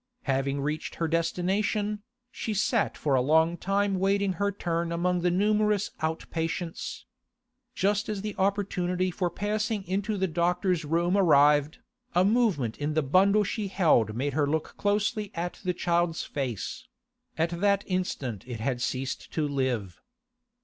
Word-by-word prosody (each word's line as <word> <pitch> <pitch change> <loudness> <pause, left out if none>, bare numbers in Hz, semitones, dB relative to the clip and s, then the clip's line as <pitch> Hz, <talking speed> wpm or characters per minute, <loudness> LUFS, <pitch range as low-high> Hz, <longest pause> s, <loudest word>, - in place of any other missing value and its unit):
Having 135 0 0
reached 150 +2 -3
her 165 - -1
destination, 205 +6 0 0.3
she 220 -2 -4
sat 225 +2 +1
for 145 - 0
a 130 - +4
long 160 +5 +3
time 195 +1 0
waiting 195 0 +2
her 200 0 +2
turn 170 -3 -2
among 175 +1 0
the 180 - +2
numerous 210 +2 +2
out 160 0 -2
patients. 165 +1 -4 0.7
Just 205 +2 +1
as 205 -2 -3
the 210 -1 -3
opportunity 185 -2 0
for 175 +1 -1
passing 210 +3 -2
into 200 +3 -1
the 190 - +1
doctor's 175 0 0
room 170 +4 +1
arrived, 150 -5 +4 0.4
a 180 - +5
movement 195 - +1
in 150 +1 -2
the 155 - +2
bundle 195 +9 +4
she 205 +1 -3
held 155 - +2
made 140 +3 -1
her 145 0 +1
look 155 +1 -2
closely 205 0 0
at 175 +1 -4
the 185 - +1
child's 175 -1 0
face; 125 -8 -4 0.5
at 165 +1 +1
that 200 -1 +3
instant 145 - -2
it 120 -3 -5
had 120 +2 -2
ceased 130 +1 -3
to 155 -2 0
live. 130 -10 -2
175 Hz, 150 wpm, -28 LUFS, 150-200 Hz, 0.7 s, a